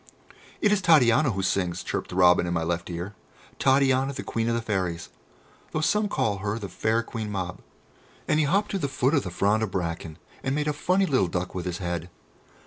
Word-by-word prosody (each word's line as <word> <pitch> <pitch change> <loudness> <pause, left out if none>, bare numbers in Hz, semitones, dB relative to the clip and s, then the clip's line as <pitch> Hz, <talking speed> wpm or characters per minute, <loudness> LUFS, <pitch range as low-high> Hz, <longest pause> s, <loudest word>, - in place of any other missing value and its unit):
"It 210 - +4
is 210 -2 +2
Titania 150 -4 +5
who 95 -4 -2
sings," 90 -2 0
chirped - - -3
the - - -7
robin 90 -1 +5
in 85 - -1
my 80 - 0
left 85 +1 -2
ear; 90 +4 -5 0.5
"Titania, 135 0 +3
the 140 - -6
Queen 115 0 -1
of 115 - +1
the 115 - -1
Fairies, 90 -6 -2 0.6
though 155 - 0
some 210 +5 +2
call 105 - 0
her 100 +2 -2
the 100 -4 -6
fair 110 +6 0
Queen 110 -3 -5
Mab!" 90 -2 -4 0.7
And 155 - +2
he 150 - +2
hopped 200 +6 +1
to 195 - -1
the 140 - -1
foot 130 +1 0
of 145 - +3
the 90 - -5
frond 100 +5 +1
of 110 - 0
bracken 85 -3 -4 0.2
and 130 - -1
made 150 0 -1
a 150 - +1
funny 185 +6 +2
little 130 - +2
duck 90 +1 -3
with 90 -1 -4
his 85 -1 -3
head. 85 -1 -4
105 Hz, 220 wpm, -26 LUFS, 90-140 Hz, 0.7 s, Titania